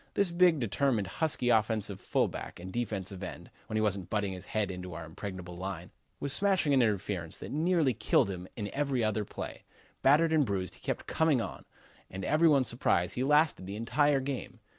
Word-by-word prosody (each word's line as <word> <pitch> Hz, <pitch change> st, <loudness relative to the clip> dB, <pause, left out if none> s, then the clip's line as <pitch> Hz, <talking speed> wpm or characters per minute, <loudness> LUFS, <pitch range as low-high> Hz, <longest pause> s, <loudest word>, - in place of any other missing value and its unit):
This 200 Hz, -3 st, +3 dB
big, 175 Hz, -2 st, +4 dB
determined, 115 Hz, -1 st, +1 dB
husky 125 Hz, -, 0 dB
offensive 110 Hz, -3 st, +1 dB
fullback -, -, -1 dB
and 95 Hz, +1 st, -8 dB
defensive 100 Hz, -5 st, -3 dB
end, 90 Hz, -, -7 dB, 0.2 s
when 110 Hz, -, -2 dB
he -, -, +2 dB
wasn't 100 Hz, -4 st, -1 dB
butting 105 Hz, -3 st, -1 dB
his 90 Hz, 0 st, -9 dB
head 105 Hz, -3 st, -1 dB
into 90 Hz, -2 st, -7 dB
our 85 Hz, 0 st, -6 dB
impregnable 90 Hz, +1 st, -7 dB
line, 90 Hz, -1 st, -5 dB, 0.3 s
was 140 Hz, -1 st, -2 dB
smashing 190 Hz, -7 st, +2 dB
an 135 Hz, -, +5 dB
interference 100 Hz, -6 st, -1 dB
that -, -, -8 dB
nearly 160 Hz, -2 st, +2 dB
killed 105 Hz, -2 st, +2 dB
him 90 Hz, -1 st, -6 dB
in 105 Hz, -2 st, -4 dB
every 140 Hz, -4 st, 0 dB
other 110 Hz, 0 st, +1 dB
play. -, -, -7 dB, 0.4 s
Battered 155 Hz, +4 st, +5 dB
and 155 Hz, -2 st, +5 dB
bruised 95 Hz, -6 st, -2 dB
he -, -, -16 dB
kept -, -, -3 dB
coming 160 Hz, -5 st, +2 dB
on, -, -, -5 dB, 0.4 s
and 95 Hz, 0 st, -6 dB
to -, -, -2 dB
every 160 Hz, +2 st, +4 dB
one's 140 Hz, -5 st, +4 dB
surprise 90 Hz, -7 st, +1 dB
he 125 Hz, -, -1 dB
lasted 150 Hz, -, +3 dB
the 100 Hz, -, -5 dB
entire 135 Hz, +6 st, +2 dB
game. 135 Hz, -1 st, -5 dB
110 Hz, 195 wpm, -31 LUFS, 95-145 Hz, 0.4 s, an